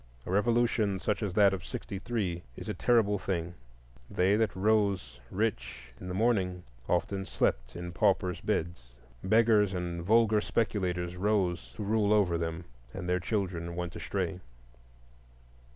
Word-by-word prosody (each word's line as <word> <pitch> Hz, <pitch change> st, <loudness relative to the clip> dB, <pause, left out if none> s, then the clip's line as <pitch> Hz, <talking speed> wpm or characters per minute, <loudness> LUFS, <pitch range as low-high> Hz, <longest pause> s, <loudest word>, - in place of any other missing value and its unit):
A -, -, -5 dB
revolution 110 Hz, -1 st, +2 dB
such 105 Hz, +3 st, -1 dB
as 100 Hz, -4 st, -2 dB
that 100 Hz, -2 st, +5 dB
of 90 Hz, -3 st, -4 dB
'63 100 Hz, -4 st, -3 dB
is -, -, -8 dB
a -, -, -2 dB
terrible 110 Hz, -4 st, +2 dB
thing; 85 Hz, -3 st, -3 dB, 0.6 s
they 95 Hz, +3 st, +2 dB
that 110 Hz, -3 st, +1 dB
rose 100 Hz, -, +1 dB
rich 65 Hz, -, -3 dB
in 90 Hz, -, -8 dB
the 90 Hz, -, -4 dB
morning 95 Hz, -5 st, +1 dB, 0.3 s
often 95 Hz, +2 st, 0 dB
slept -, -, -1 dB
in 85 Hz, 0 st, -5 dB
paupers' 90 Hz, -1 st, +1 dB
beds. 65 Hz, -8 st, -3 dB, 0.3 s
Beggars 105 Hz, -1 st, +4 dB
and 85 Hz, -1 st, -3 dB
vulgar 110 Hz, +2 st, +4 dB
speculators 90 Hz, -6 st, -1 dB
rose 95 Hz, -3 st, 0 dB
to 105 Hz, -, -5 dB
rule 105 Hz, 0 st, +2 dB
over 100 Hz, -5 st, +3 dB
them, 85 Hz, +1 st, -3 dB, 0.3 s
and 95 Hz, -2 st, -5 dB
their 90 Hz, 0 st, +1 dB
children 90 Hz, -3 st, -2 dB
went 90 Hz, 0 st, -4 dB
astray. 95 Hz, -2 st, -3 dB
95 Hz, 140 wpm, -30 LUFS, 85-105 Hz, 0.6 s, that